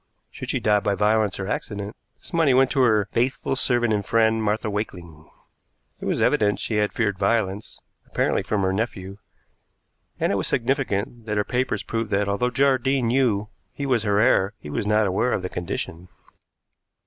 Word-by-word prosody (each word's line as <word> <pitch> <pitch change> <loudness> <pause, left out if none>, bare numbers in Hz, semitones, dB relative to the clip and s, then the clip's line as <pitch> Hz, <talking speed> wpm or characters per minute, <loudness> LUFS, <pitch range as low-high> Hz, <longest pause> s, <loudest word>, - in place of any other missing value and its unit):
Should - - -8
she - - 0
die 105 -1 +3
by 100 0 0
violence 105 0 +1
or 95 - -3
accident, 105 0 -4 0.2
this - - -15
money 160 -6 +3
went 130 0 +4
to 135 - +2
her 110 -5 +3
"faithful 130 +2 0
servant 120 -4 +2
and 105 -1 0
friend, 110 +1 +2
Martha 110 +1 -1
Wakeling." 90 -7 -6 0.7
It - - -7
was - - 0
evident 105 -1 +2
she 110 - -2
had 105 0 +1
feared 100 -4 -1
violence 105 -3 -1 0.3
apparently - - +1
from 105 -2 -1
her 95 0 +1
nephew 100 -2 -4 1.0
and - - +1
it 100 - +1
was 95 - +1
significant 120 -3 -1
that 105 -1 -1
her 105 - +2
papers 125 +4 -1
proved 115 -2 -3
that, 100 0 +1
although 100 +5 0
Jardine 130 -1 +2
knew 115 -5 +1 0.2
he 140 - -4
was 125 -4 +2
her 105 -1 +1
heir, 105 -4 +3
he 75 - -9
was 100 - -2
not 105 0 +3
aware 100 +6 +1
of 90 - -2
the 90 - -3
condition. 85 0 -5
105 Hz, 185 wpm, -23 LUFS, 100-120 Hz, 1.0 s, went